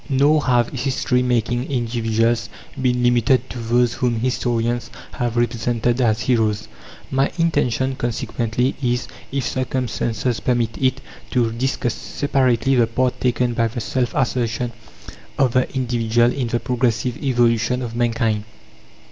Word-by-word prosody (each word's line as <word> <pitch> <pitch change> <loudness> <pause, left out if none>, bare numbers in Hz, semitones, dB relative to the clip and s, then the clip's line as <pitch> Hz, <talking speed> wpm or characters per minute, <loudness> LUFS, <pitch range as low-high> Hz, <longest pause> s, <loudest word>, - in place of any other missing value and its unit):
Nor 145 +3 +3
have 120 -2 +3
history 125 -1 0
making 120 0 0
individuals 115 -2 0 0.3
been 125 -1 +1
limited 120 +1 +3
to 120 - -6
those 120 +1 +2
whom 125 -2 0
historians 120 -1 -1 0.2
have 120 -1 -2
represented 120 +1 0
as 110 -2 +2
heroes. 110 -3 +1 0.4
My 135 +1 +2
intention, 135 -6 +1
consequently, 120 +1 -1
is, 125 -1 0 0.2
if 135 -1 -1
circumstances 125 -2 -1
permit 120 -3 0
it, 130 -1 +1 0.3
to 120 -3 +1
discuss 120 0 -1
separately 135 -2 +1
the 120 -3 +4
part 125 +2 -1
taken 125 -1 +1
by 115 0 +1
the 115 +2 -5
self 125 +2 -1
assertion 120 -3 0 0.7
of 135 -3 +3
the 130 0 +1
individual 120 -1 +2
in 130 -4 -2
the 120 +1 0
progressive 120 -1 -1
evolution 120 -1 +2
of 115 -1 -5
mankind. 115 -3 0
120 Hz, 130 wpm, -21 LUFS, 115-130 Hz, 0.7 s, the